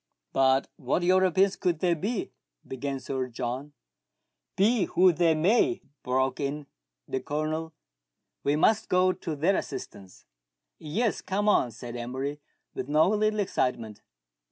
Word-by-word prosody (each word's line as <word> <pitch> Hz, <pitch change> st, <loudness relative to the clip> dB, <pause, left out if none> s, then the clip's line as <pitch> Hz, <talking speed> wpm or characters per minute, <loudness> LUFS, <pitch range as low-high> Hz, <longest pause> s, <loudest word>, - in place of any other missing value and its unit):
" -, -, -59 dB
But 135 Hz, 0 st, +3 dB
what 140 Hz, +5 st, -1 dB
Europeans 185 Hz, +1 st, +3 dB
could 175 Hz, -3 st, 0 dB
they 175 Hz, +2 st, +2 dB
be 200 Hz, +7 st, -3 dB, 0.2 s
?" -, -, -31 dB
began 135 Hz, +1 st, -4 dB
Sir 130 Hz, -1 st, -3 dB
John. 125 Hz, +4 st, -5 dB, 0.8 s
Be 210 Hz, +1 st, +3 dB
who 185 Hz, 0 st, +4 dB
they 165 Hz, 0 st, +3 dB
may," 235 Hz, -, +2 dB, 0.2 s
broke 130 Hz, +1 st, 0 dB
in 145 Hz, +1 st, -3 dB, 0.4 s
the 130 Hz, -, -2 dB
Colonel, 155 Hz, +3 st, -3 dB, 0.7 s
"we 140 Hz, +1 st, +2 dB
must 215 Hz, +8 st, +2 dB
go 185 Hz, 0 st, +4 dB
to 160 Hz, -4 st, -5 dB
their 170 Hz, +7 st, +2 dB
assistance." 95 Hz, -, -7 dB, 0.3 s
" -, -, -58 dB
Yes; 205 Hz, +9 st, -1 dB
come 205 Hz, +2 st, -1 dB
on," 205 Hz, -11 st, +4 dB
said 120 Hz, +1 st, -9 dB
Emery, 130 Hz, +5 st, -4 dB, 0.3 s
with -, -, -5 dB
no 155 Hz, +4 st, +4 dB
little 215 Hz, 0 st, +1 dB
excitement. 120 Hz, -, -2 dB
155 Hz, 145 wpm, -27 LUFS, 130-185 Hz, 0.8 s, who